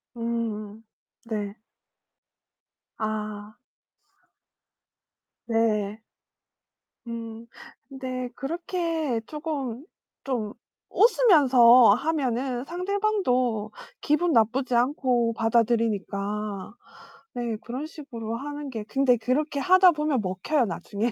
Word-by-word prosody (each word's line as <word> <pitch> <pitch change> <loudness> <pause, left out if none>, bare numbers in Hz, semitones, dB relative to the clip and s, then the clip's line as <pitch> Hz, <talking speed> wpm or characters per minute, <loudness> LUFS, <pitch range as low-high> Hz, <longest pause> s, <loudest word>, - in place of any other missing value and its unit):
음. 225 -2 -4 0.4
네. 210 -3 -4 1.4
아. 215 -1 -4 1.9
네. 220 -2 0 1.1
음. 230 -1 -7 0.4
근데 255 -2 -5
그렇게 325 -2 -2
조금 295 -5 -4 0.4
좀 230 -6 -3 0.4
웃으면서 260 - +6
하면은 255 -3 -1
상대방도 345 - 0 0.3
기분 330 +4 +2
나쁘지 245 +1 +2
않고 245 -2 +2
받아들이니까. 215 -3 -1 0.6
네. 235 -2 -2
그런 260 +6 -5
식으로 235 -8 -7
하는 290 +3 -6
게 225 -5 -5
근데 255 +2 +2
그렇게 280 +6 -1
하다 370 +4 +6
보면 300 -4 0
먹혀요, 195 +9 0
나중에. 200 +5 -3
245 Hz, 175 characters per minute, -26 LUFS, 220-290 Hz, 1.9 s, 웃으면서